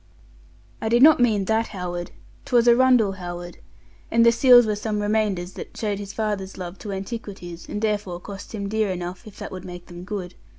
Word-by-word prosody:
I 220 - -1
did 240 +3 +5
not 310 -1 +8
mean 215 -5 +3
that 220 +2 +1
Howard. 175 -3 -5 0.4
'Twas 240 -1 +3
Arundel 240 -5 +5
Howard. 175 -1 -7 0.5
And 230 0 +4
the 235 - +7
seals 245 0 +7
were 215 -1 0
some 210 0 -2
remainders 205 -4 0
that - - -9
showed 205 -2 -2
his 200 -1 -6
father's 205 -3 -3
love 180 0 -7
to 205 - -6
antiquities, 195 -4 -7
and 210 +1 -4
therefore 205 -5 -1
cost 200 +4 -9
him 200 -2 -3
dear 215 0 0
enough 180 +3 -5
if 210 - -12
that - - -7
would 185 -1 -7
make 175 -1 -9
them 175 0 -10
good. 185 -2 -5
205 Hz, 195 wpm, -24 LUFS, 180-220 Hz, 0.5 s, not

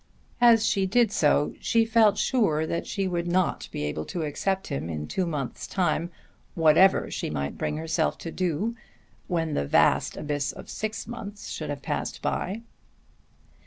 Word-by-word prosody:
As 230 -2 +6
she 195 -5 +2
did 230 +2 +3
so 150 -4 +2
she 230 -1 +2
felt 220 -2 +4
sure 160 - +2
that 170 +1 -3
she 195 -2 -1
would 175 -1 -2
not 180 +1 0
be - - -4
able 75 +1 -2
to 170 - -4
accept 190 +6 -1
him 135 - -4
in 75 -2 -4
two 185 -2 -1
months' 145 -6 -4
time 175 -2 0 0.5
whatever 165 +3 +5
she - - -3
might 70 -1 -3
bring 150 - -2
herself 160 0 0
to 165 - -3
do 185 +7 -1 0.5
when 165 -3 -1
the 70 - -1
vast - - +3
abyss 145 -1 -2
of - - -10
six 215 0 -4
months 210 -3 -7
should - - -5
have - - -5
passed - - -3
by. 205 +5 -2
175 Hz, 165 wpm, -26 LUFS, 150-205 Hz, 0.5 s, As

